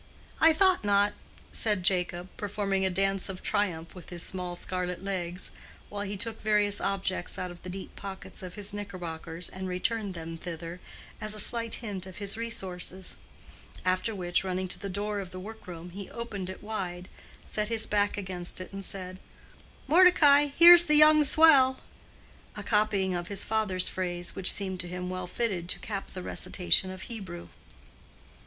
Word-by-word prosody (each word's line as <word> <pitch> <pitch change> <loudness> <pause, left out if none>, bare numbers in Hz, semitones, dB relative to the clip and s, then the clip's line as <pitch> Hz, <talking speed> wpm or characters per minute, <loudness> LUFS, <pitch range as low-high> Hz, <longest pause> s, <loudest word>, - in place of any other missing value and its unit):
"I 325 - +7
thought 370 - +3
not," 205 0 +3 0.4
said 210 -4 +1
Jacob, 180 -1 0
performing 200 -2 -1
a 190 - +3
dance 195 +1 0
of 185 -1 -7
triumph 170 -5 -1
with 180 -3 -11
his 175 -2 -3
small 180 -2 -3
scarlet 180 0 -3
legs, 180 -2 -4 0.4
while 205 0 -4
he 205 0 -4
took 225 +2 0
various 210 -1 +2
objects 190 -2 -2
out 180 -1 -4
of 175 - -13
the 185 - -8
deep 190 +1 -8
pockets 195 -1 -8
of 180 -1 -8
his 205 -1 -3
knickerbockers 175 -4 -4
and 190 0 -6
returned 200 +2 -2
them 165 0 -7
thither, 170 0 -7 0.4
as 215 0 -1
a - - -6
slight 230 +2 0
hint 190 -3 -5
of 185 - -11
his 200 -1 -1
resources; 190 -5 -1 0.7
after 185 +4 0
which, 175 -1 0
running 185 0 -2
to - - -4
the 200 - -5
door 205 +2 -3
of 190 -2 -6
the 185 - -8
workroom, 180 -4 -9
he 195 +2 -8
opened 210 -6 -6
it 190 - -9
wide, 185 -4 -5 0.4
set 210 0 -2
his 225 -1 +2
back 205 0 0
against 185 -3 -4
it, 185 +1 -9
and 195 0 -6
said, 185 -1 -3 0.7
"Mordecai, 300 -4 +6
here's 345 +1 +10
the 300 - +3
young 305 0 +7
swell"—a 275 -3 +2
copying 210 -3 +1
of 175 -1 -3
his 200 -1 +3
father's 210 -4 +1
phrase, 175 -1 -3
which 190 - +7
seemed 190 -2 -1
to 175 - -1
him 180 +1 -5
well 185 -1 -4
fitted 185 -5 -2
to - - +2
cap 200 -3 -5
the 185 - -8
recitation 185 +1 +1
of 185 0 -8
Hebrew. 190 -7 -8
190 Hz, 170 wpm, -28 LUFS, 180-210 Hz, 0.7 s, here's